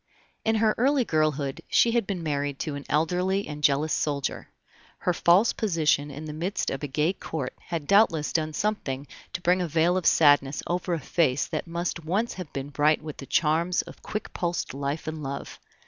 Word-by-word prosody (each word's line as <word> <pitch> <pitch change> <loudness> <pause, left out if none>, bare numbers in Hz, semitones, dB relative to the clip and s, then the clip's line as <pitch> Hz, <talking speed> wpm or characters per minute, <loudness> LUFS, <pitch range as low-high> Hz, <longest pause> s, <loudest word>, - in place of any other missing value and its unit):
In 220 0 +2
her 220 0 +3
early 270 0 +3
girlhood 155 -4 0
she 235 - +4
had 235 -4 +1
been 185 -4 -3
married 145 -2 -1
to 155 - -3
an 140 0 -6
elderly 180 +6 +1
and 150 0 -7
jealous 150 +2 +3
soldier. 145 -2 -2 0.5
Her 180 - 0
false 180 +7 +4
position 160 -8 +1
in 145 +2 -7
the 150 - -6
midst 175 +7 -2
of 135 - -4
a 145 - -3
gay 150 +6 +1
Court 145 -8 -5
had 165 -4 -3
doubtless 170 -5 +3
done 155 -1 0
something 150 -9 -2 0.3
to 180 - -4
bring 180 +1 +3
a 175 - -1
veil 165 +3 +2
of 185 - 0
sadness 145 -2 +4
over 175 0 -1
a - - -3
face 145 -5 +1
that 155 +2 -4
must 170 0 -3
once 200 +9 0
have 180 -5 -8
been 135 +1 -5
bright 150 +2 +2
with 155 -2 -7
the 135 - -9
charms 170 +1 +2
of - - -13
quick 215 -1 -5
pulsed 175 -5 -2
life 140 +3 -3
and 155 0 -4
love. 140 -1 -6
160 Hz, 195 wpm, -26 LUFS, 145-180 Hz, 0.5 s, she